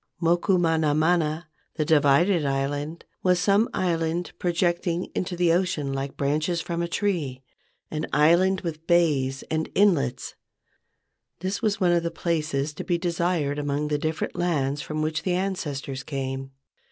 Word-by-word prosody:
Moku 175 +2 +2
mana 160 -3 +2
mana 160 0 +1 0.3
(the 155 - 0
divided 155 +3 +4
island) 145 +3 -2 0.2
was 180 -1 +3
some 200 +4 +3
island 170 -1 -1
projecting 175 0 0
into 180 0 -2
the 175 -1 +3
ocean 170 -6 0
like 135 0 -4
branches 155 +5 0
from 170 +1 -3
a 170 - -1
tree, 165 -9 -2 0.5
an 155 -1 -3
island 175 +6 +4
with 160 -2 -6
bays 145 -6 +2
and 160 0 -1
inlets. 160 -11 +2 1.1
This 190 +2 -2
was 215 -2 0
one 180 -3 +3
of 170 -1 +3
the 170 - -2
places 155 -4 -1
to - - -6
be 175 - 0
desired 170 -4 0
among 145 +1 -1
the 150 -1 0
different 155 +1 -2
lands 145 -5 0
from 155 0 -3
which 155 +1 -1
the 185 - -1
ancestors 150 -8 -3
came. 135 -1 -4
165 Hz, 150 wpm, -25 LUFS, 145-175 Hz, 1.1 s, divided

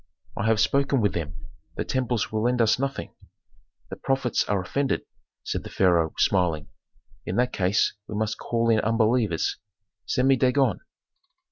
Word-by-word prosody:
"I 100 - -1
have 110 -1 +3
spoken 140 +4 +2
with 105 -5 +1
them. 80 -3 -4 0.4
The - - -3
temples 125 -3 -1
will 110 0 -1
lend 125 +2 +1
us 115 +1 +3
nothing." 135 0 -3 0.8
"The - - -5
prophets 135 -3 0
are 100 -1 0
offended," 135 +9 -1 0.4
said - - -3
the - - -8
pharaoh, 85 -4 +2
smiling. 85 -6 +1 0.6
"In 90 - -2
that 125 +2 +1
case 95 +3 +1
we 105 - -6
must 110 +1 -2
call 115 0 0
in 110 - +4
unbelievers. 110 -4 +1 0.5
Send 125 - +1
to - - +4
me 135 - +5
Dagon." 130 +1 +2
110 Hz, 160 wpm, -25 LUFS, 95-125 Hz, 0.8 s, me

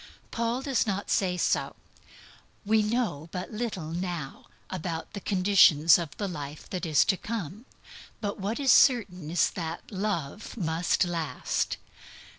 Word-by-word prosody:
Paul 235 +3 -1
does 270 -5 +1
not 200 0 -2
say 180 -2 +1
so. - - 0 0.9
We 220 +1 +4
know 210 - -1
but 180 +4 -5
little 210 -8 -4
now 175 -5 -5 0.2
about 170 -1 -4
the 200 - -4
conditions 180 -6 +5
of 160 -5 -6
the 205 - -2
life 150 -4 -7
that 180 -2 -3
is 155 -3 +4
to 190 - +2
come. 215 - -5 0.5
But 205 -2 -3
what 205 +6 -2
is 275 -2 +4
certain 190 - +4
is 170 +1 +2
that 165 +3 -6
Love 200 -1 -3
must 170 0 +1
last. 165 -6 -2
185 Hz, 140 wpm, -28 LUFS, 165-210 Hz, 0.9 s, conditions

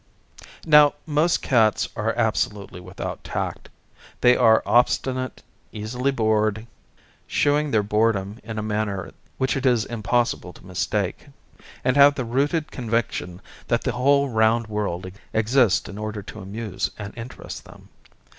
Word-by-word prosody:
Now 150 -2 +6
most 155 +3 +1
cats 110 -5 +3
are - - -1
absolutely 100 -3 -1
without 90 +1 -7
tact; - - -4 0.5
they 125 0 +6
are 110 -3 +5
obstinate, 130 +2 +1 0.3
easily 120 +5 -2
bored 110 -3 +1 0.6
(shewing 150 +1 +2
their 110 -5 +2
boredom 105 0 0
in 110 0 -6
a 110 - -2
manner 105 -3 -2 0.3
which 130 - 0
it 135 - -2
is 120 -5 +3
impossible 115 -4 -1
to - - -17
mistake), 90 +5 -2 0.6
and 130 - +2
have 140 0 +7
the 130 -4 -3
rooted 145 +6 0
con 120 -4 -6
viction 95 -6 -2 0.3
that - - +1
the - - 0
whole 140 +3 +3
round 115 -1 +2
world 105 -5 -3 0.3
exists 110 0 +3
in 100 +1 -8
order 105 -1 -5
to 110 - -10
amuse 100 +1 -4
and 100 -1 -7
interest 120 +2 -8
them. - - -16
110 Hz, 140 wpm, -23 LUFS, 105-130 Hz, 0.6 s, have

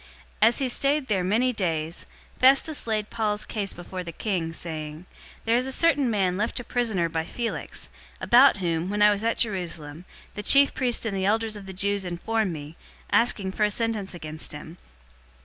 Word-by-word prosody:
025:014 220 - +8
As 235 - -1
he 270 - +1
stayed 275 +3 +1
there 190 -4 +1
many 230 +7 +1
days, 165 -5 -3 0.3
Festus 275 +2 +3
laid 215 -1 -1
Paul's 210 -2 -1
case 200 -3 -4
before 180 +1 -7
the 170 - -7
king, 170 -2 -2
saying, 155 -1 -5 0.4
"There 230 +1 +3
is 250 +2 +1
a - - -3
certain 285 -3 +3
man 190 -4 +1
left 215 +5 -1
a - - -6
prisoner 220 -8 0
by 160 -1 -2
Felix; 230 +7 -4 0.3
025:015 - - -13
about 250 0 +6
whom, 170 -1 -1
when 205 +1 +1
I 210 - +7
was 205 +1 -2
at 230 0 0
Jerusalem, 170 -6 -3 0.3
the 210 - -5
chief 275 +6 +5
priests 245 -2 0
and 210 -3 -2
the 190 -1 -1
elders 220 +1 0
of 200 -2 -10
the - - -6
Jews 200 +1 -1
informed 190 +4 -1
me, 150 0 -8 0.3
asking 210 -5 +2
for 210 - -1
a 210 - +4
sentence 215 -4 -2
against 155 -2 -6
him. 160 +3 -10
205 Hz, 195 wpm, -25 LUFS, 175-230 Hz, 0.4 s, 025:014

